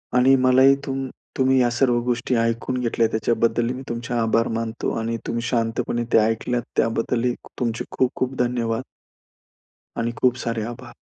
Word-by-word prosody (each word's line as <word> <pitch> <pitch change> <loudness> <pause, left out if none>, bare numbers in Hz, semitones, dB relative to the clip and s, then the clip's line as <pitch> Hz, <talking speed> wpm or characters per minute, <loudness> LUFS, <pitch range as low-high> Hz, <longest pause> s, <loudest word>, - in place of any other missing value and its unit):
आणि 130 +2 +6
मला 130 0 +5
ही 135 +1 +7
तुम 135 -1 -3 0.3
तुम्ही 130 0 +3
या 120 - +3
सर्व 120 -1 +2
गोष्टी 125 +1 0
ऐकून 115 +2 -1
घेतल्या, 115 -2 +1
त्याच्याबद्दल 115 +1 +1
मी 130 - -7
तुमचे 120 +1 -4
आभार 115 -1 +2
मानतो 115 0 -3
आणि 115 +1 -2
तुम्ही 115 0 -1
शांतपणे 120 0 -1
ते - - +7
ऐकल्यात, 115 +2 0 0.2
त्याबद्दल 115 +2 +1 0.3
तुमचे 115 -2 -1
खूप-खूप 130 0 0
धन्यवाद. 120 -1 0 1.2
आणि 115 0 0
खूप 125 -1 +4
सारे 115 -2 -1
आभार. 120 -1 -13
120 Hz, 150 wpm, -23 LUFS, 115-125 Hz, 1.2 s, ही